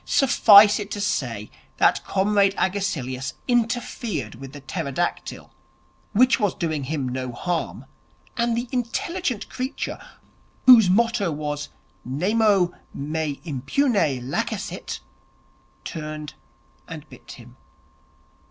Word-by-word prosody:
'Suffice 215 -6 +6
it 205 -1 -5
to 205 - -4
say 115 - -2 0.3
that - - +3
Comrade 200 0 +2
Agesilaus 145 -10 -2
interfered 235 - -1
with 135 +3 -10
the 145 - -9
pterodactyl, 160 +2 -4 0.6
which 250 +4 +4
was 205 -5 +1
doing 155 -5 -2
him 140 -2 -2
no 130 0 -3
harm; 170 +8 -3 0.5
and 235 -1 0
the 240 +1 -2
intelligent 255 - -2
creature, 260 +1 -4 0.7
whose 230 -7 +9
motto 225 -1 +2
was 150 -1 -4 0.3
"Nemo 190 - +2 0.2
me 150 0 -3
impune 165 - 0 0.3
lacessit", 135 - -4 0.8
turned 155 -2 -6 0.5
and - - -9
bit - - -13
him. - - -14
185 Hz, 105 wpm, -23 LUFS, 145-230 Hz, 0.8 s, whose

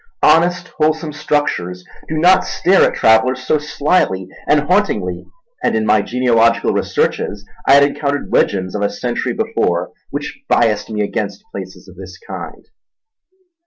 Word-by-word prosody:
Honest, 175 +2 +3
wholesome 155 0 0
structures 90 -13 -2 0.2
do 155 - -3
not 180 +4 +5
stare 190 +2 +2
at - - -1
travellers 130 +4 +3
so 155 - +2
slyly 145 - 0 0.2
and 150 0 +4
hauntingly, 185 +8 -1 0.4
and - - +1
in 110 -1 0
my 110 -1 +3
genealogical 115 0 +2
researches 100 -1 -1 0.2
I 135 - +6
had 140 0 +7
encountered 140 0 -2
legends 95 -2 +1
of 105 - -3
a 100 - +1
century 120 +4 -3
before 200 - -1 0.2
which - - -6
biassed 105 -1 +2
me 105 -1 -2
against 100 - -4
places - - -9
of - - -15
this - - -10
kind. 450 0 -9
135 Hz, 145 wpm, -17 LUFS, 105-155 Hz, 0.4 s, had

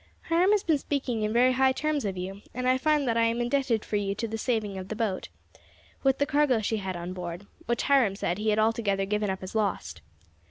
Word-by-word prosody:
"Hiram 345 +3 +4
has 415 -1 +3
been 315 -4 +2
speaking 260 -6 -2
in 215 0 0
very 245 +3 +4
high 260 +1 +3
terms 300 -2 -1
of 190 -2 -3
you, 190 +2 -5
and 250 0 -1
I 255 0 +3
find 300 -1 +2
that 230 -1 +1
I 230 - +4
am 230 +1 0
indebted 240 -2 +1
to 210 - -1
you 200 -1 -2
for 230 - -3
the 225 0 -4
saving 215 -5 -1
of 185 - -7
the 215 - -4
boat, 210 -4 -2 0.7
with 270 -1 +2
what 285 - +2
cargo 290 -5 +3
she 220 +1 -1
had 190 -2 -4
on 175 +1 -5
board, 175 +1 -6 0.2
which 235 0 0
Hiram 260 -8 +3
said 180 -1 -2
he 215 +1 0
had 210 - +2
altogether 215 -3 +1
given 210 +1 -1
up 190 0 -3
as 185 - -7
lost. 190 - -2
225 Hz, 240 wpm, -27 LUFS, 195-265 Hz, 0.7 s, Hiram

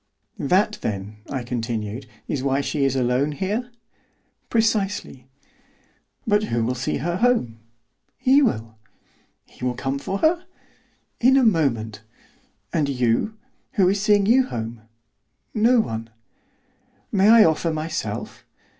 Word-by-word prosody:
"That, 195 +8 +1
then," 105 0 -4
I 135 -3 -3
continued, 115 -1 -4 0.2
"is 140 - -2
why 135 +1 +1
she 140 0 -1
is 135 -1 +1
alone 130 +3 +1
here?" 210 - -2 0.8
"Precisely." 205 - 0 1.0
"But 210 -1 +2
who 115 - -1
will 125 - 0
see 125 +1 -2
her 170 +5 -2
home?" 195 - +1 0.6
"He 270 +3 +4
will." 110 - -1 0.7
"He - - -15
will 125 -1 0
come 135 +2 -2
for 195 +7 -3
her?" 335 - +2 0.7
"In 260 +3 +5
a 265 - +4
moment." 120 - +1 0.7
"And 150 -4 +1
you, 125 - 0 0.4
who 190 -7 +4
is 200 +1 0
seeing 205 -1 +4
you 250 +4 +4
home?" 115 - -5 0.7
"No 235 +3 +4
one." 115 - -3 1.0
"May 200 +1 +4
I 225 -1 +8
offer 160 +1 +1
myself?" 155 -9 -4
150 Hz, 130 wpm, -23 LUFS, -, 1.0 s, I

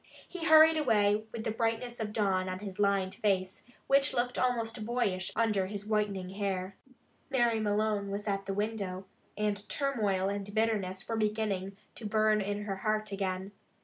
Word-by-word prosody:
He 360 -3 -6
hurried 315 0 +8
away 215 -6 +2
with 230 -2 -5
the 220 - -1
brightness 230 +2 -1
of 215 -1 -3
dawn 190 -3 +1
on 185 - -3
his 195 -1 -8
lined 200 -2 +2
face, 190 -2 0 0.2
which 275 0 +3
looked 245 +1 0
almost 230 -3 0
boyish 210 -5 -1
under 210 -5 +1
his 205 0 -6
whitening 210 -4 -1
hair. 195 -1 -3 0.5
Mary 240 -4 +2
Malone 210 -1 0
was 205 +2 -4
at 195 -1 -1
the 195 - -1
window, 200 -3 -3 0.3
and 210 -1 -1
turmoil 210 -10 0
and 200 +1 -4
bitterness 205 -4 0
were 225 - -2
beginning 210 -3 -1 0.2
to 220 - -6
burn 215 0 +3
in 205 +1 -2
her 195 -2 -3
heart 215 +1 -1
again. 190 0 -3
210 Hz, 165 wpm, -31 LUFS, 195-225 Hz, 0.5 s, hurried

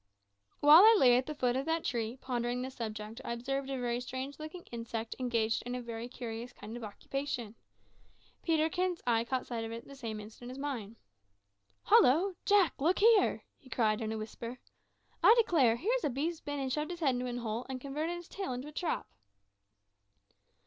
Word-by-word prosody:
While 295 +3 +10
I 440 +1 +8
lay 245 -2 +7
at 255 +3 +1
the 305 - -4
foot 250 -3 +1
of 270 +3 -2
that 325 0 0
tree, 235 0 -2
pondering 245 -1 -2
this 260 +1 -6
subject, 220 0 -6
I - - -3
observed 270 +3 -3
a 270 - -2
very 240 -1 -1
strange 260 +3 -5
looking 310 +3 -8
insect 230 -1 -4
engaged 230 -3 0
in 245 +1 -5
a - - -3
very 230 0 -5
curious 240 -1 -6
kind 220 +2 -9
of 240 - -7
occupation. 240 +1 -4 0.9
Peterkin's 335 +2 0
eye 230 -2 +3
caught 255 +2 -2
sight 230 -2 -4
of 225 - -5
it 230 +1 -6
at - - -20
the 275 - -11
same 225 -5 -5
instant 220 +3 -10
with 255 - -7
mine. 250 -7 -4 0.9
"Hollo! 335 +10 +5
Jack, 400 -5 +5
look 340 +6 +3
here!" 440 -1 +4 0.2
he 260 - -18
cried 215 -3 +1
in 220 -1 -2
a 220 - -2
whisper. 230 +3 -6 0.6
"I 450 - +8
declare, 305 - +4
here's 460 - 0
a - - +2
beast 310 +6 -2
been 290 -1 -3
and 265 -2 -2
shoved 300 +2 -1
its 345 -1 -7
head 275 -5 +3
into 250 0 -2
a 245 0 -3
hole, 230 0 -3
and 260 -1 -4
converted 300 +6 -3
its 345 -1 -10
tail 390 -10 -4
into 255 +4 -5
a - - -11
trap!" 325 +2 -2
255 Hz, 195 wpm, -32 LUFS, 235-300 Hz, 0.9 s, While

